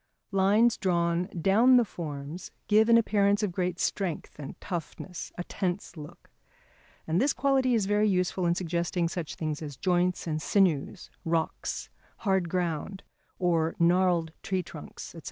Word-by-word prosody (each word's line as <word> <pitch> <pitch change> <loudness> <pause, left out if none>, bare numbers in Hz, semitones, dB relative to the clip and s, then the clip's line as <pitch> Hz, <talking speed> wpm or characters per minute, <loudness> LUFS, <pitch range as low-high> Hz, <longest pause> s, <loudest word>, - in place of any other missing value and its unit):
Lines 205 +4 +4
drawn 170 -2 +1
down 205 +8 +4
the 240 - +4
forms 155 -2 -7 0.2
give 215 +2 +4
an 230 - +7
appearance 205 -2 +2
of 205 - 0
great 180 0 -2
strength 180 -6 -2
and 140 - -8
toughness, 175 0 -6
a 175 - -3
tense 185 0 -3
look. 150 -1 -12 0.7
And 160 +3 +1
this 280 +2 +3
quality 265 -2 +2
is 215 -4 +1
very 205 +1 +2
useful 180 -1 0
in 170 - +2
suggesting 170 0 -1
such 165 -2 -5
things 155 -2 -3
as 145 -4 -7
joints 180 +1 +1
and 155 -2 -2
sinews, 180 -2 +1
rocks, 165 -2 -2 0.3
hard 190 -5 0
ground, 180 +1 -2 0.3
or 165 -3 +1
gnarled 175 -1 +3
tree 190 -1 -1
trunks, 155 - -10
&c. 170 - -9
180 Hz, 150 wpm, -28 LUFS, 165-200 Hz, 0.7 s, an